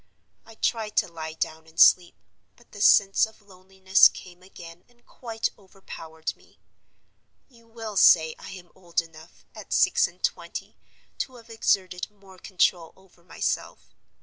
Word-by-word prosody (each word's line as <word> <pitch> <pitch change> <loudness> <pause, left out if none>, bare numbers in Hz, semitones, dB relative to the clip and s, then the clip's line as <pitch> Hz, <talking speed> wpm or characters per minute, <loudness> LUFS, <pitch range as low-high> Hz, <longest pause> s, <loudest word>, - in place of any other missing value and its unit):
I 225 - -14
tried 220 -1 -2
to - - +3
lie 160 -2 -8
down 160 0 -5
and 160 +1 -12
sleep, 175 -1 +6 0.4
but 240 - -25
the 205 - -10
sense 200 0 +5
of 220 - -19
loneliness 190 -1 +3
came 180 -1 -13
again 175 -2 -13
and 240 0 -30
quite 225 -2 -4
overpowered 165 -5 -9
me. - - -26 0.9
You 230 -3 -23
will 225 -2 -8
say 160 -3 +6
I - - -10
am 180 -2 -12
old 175 -3 -3
enough, 165 0 -10
at - - -8
six - - +3
and - - -19
twenty, 485 - -4 0.4
to 260 - -4
have 230 -1 -15
exerted 185 -5 -1
more 195 -3 -19
control 175 -3 0
over 190 -2 -25
myself. 180 - -4
190 Hz, 150 wpm, -25 LUFS, 170-220 Hz, 0.9 s, sleep